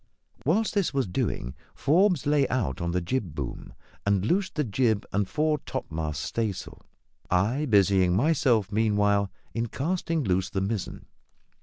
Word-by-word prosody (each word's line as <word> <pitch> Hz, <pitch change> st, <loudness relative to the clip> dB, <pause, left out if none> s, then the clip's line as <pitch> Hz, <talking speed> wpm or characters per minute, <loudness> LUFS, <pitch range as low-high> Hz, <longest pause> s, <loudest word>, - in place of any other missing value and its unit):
While 180 Hz, +10 st, +3 dB
this 200 Hz, -8 st, 0 dB
was 135 Hz, -, +2 dB
doing, 65 Hz, -8 st, -2 dB, 0.2 s
Forbes 180 Hz, +1 st, +3 dB
lay 145 Hz, -2 st, +3 dB
out 105 Hz, -, -1 dB
upon 85 Hz, -, -2 dB
the 90 Hz, +1 st, 0 dB
jib 90 Hz, -, -2 dB
boom 70 Hz, -4 st, -6 dB, 0.3 s
and 100 Hz, -1 st, +1 dB
loosed 190 Hz, -, 0 dB
the 150 Hz, -, +1 dB
jib 110 Hz, -2 st, +1 dB
and 100 Hz, -1 st, 0 dB
fore 155 Hz, 0 st, +1 dB
topmast 80 Hz, -, -4 dB
staysail, 110 Hz, -5 st, -3 dB, 0.5 s
I 115 Hz, +12 st, +1 dB
busying 95 Hz, -4 st, +4 dB
myself, 125 Hz, -, +2 dB
meanwhile, 105 Hz, -2 st, +2 dB, 0.2 s
in 115 Hz, 0 st, -1 dB
casting 165 Hz, +4 st, -1 dB
loose 95 Hz, -3 st, 0 dB
the 95 Hz, -, -2 dB
mizzen. 100 Hz, +1 st, -3 dB
110 Hz, 145 wpm, -27 LUFS, 95-145 Hz, 0.5 s, busying